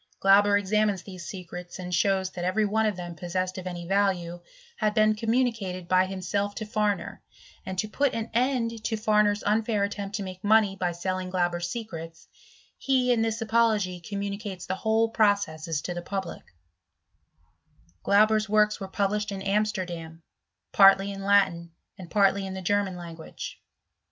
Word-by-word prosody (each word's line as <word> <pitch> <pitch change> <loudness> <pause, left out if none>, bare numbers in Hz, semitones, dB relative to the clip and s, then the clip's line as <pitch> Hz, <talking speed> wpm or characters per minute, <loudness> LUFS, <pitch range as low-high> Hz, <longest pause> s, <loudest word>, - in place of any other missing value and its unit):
Glauber 200 +1 +5
examines 205 -1 +1
these 185 -3 -9
secrets, 180 -2 -8
and 180 -1 -6
shows 190 +1 +1
that 175 - -6
every 195 +4 +1
one 220 +2 +1
of 210 - -1
them 175 -1 -6
possessed 185 +2 -3
of 185 - -7
any 175 -1 -5
value, 180 -3 0 0.4
had 215 0 0
been 215 -1 +4
communicated 220 -5 -1
by 185 +1 +3
himself 195 +2 -2
to 215 - -4
Farmer, 210 -1 -1 0.5
and 190 - -4
to 215 - 0
put 275 +5 0
an 225 0 -4
end 230 -2 0
to 220 0 -1
Farmer's 210 -1 +2
unfair 215 0 +1
attempt 200 0 -3
to 200 - -3
make 185 +1 -8
money 210 -2 +4
by 180 -2 -1
selling 185 +2 -3
Glauber's 175 -1 -1
secrets, 165 -7 -7 0.5
he 255 -2 +2
in 230 - +1
this 225 0 -1
apology 220 -5 +1
communicates 200 0 -5
the 185 - -2
whole 220 +3 +1
processes 200 -9 0
to 175 - -3
the 175 - -5
public 190 -1 -5
j - - -25 1.5
Glauber*8 215 +1 +3
works 210 0 +3
were 195 - -5
published 210 +1 -1
in 195 -1 -5
Amsterdam, 185 -6 -2 0.5
partly 195 0 +6
in 195 0 -7
Latin, 190 -4 +2 0.3
and 180 -2 -9
partly 195 0 +2
in 190 - -6
the 190 - -6
German 200 0 0
language. 170 -2 -8
200 Hz, 160 wpm, -27 LUFS, 185-215 Hz, 1.5 s, partly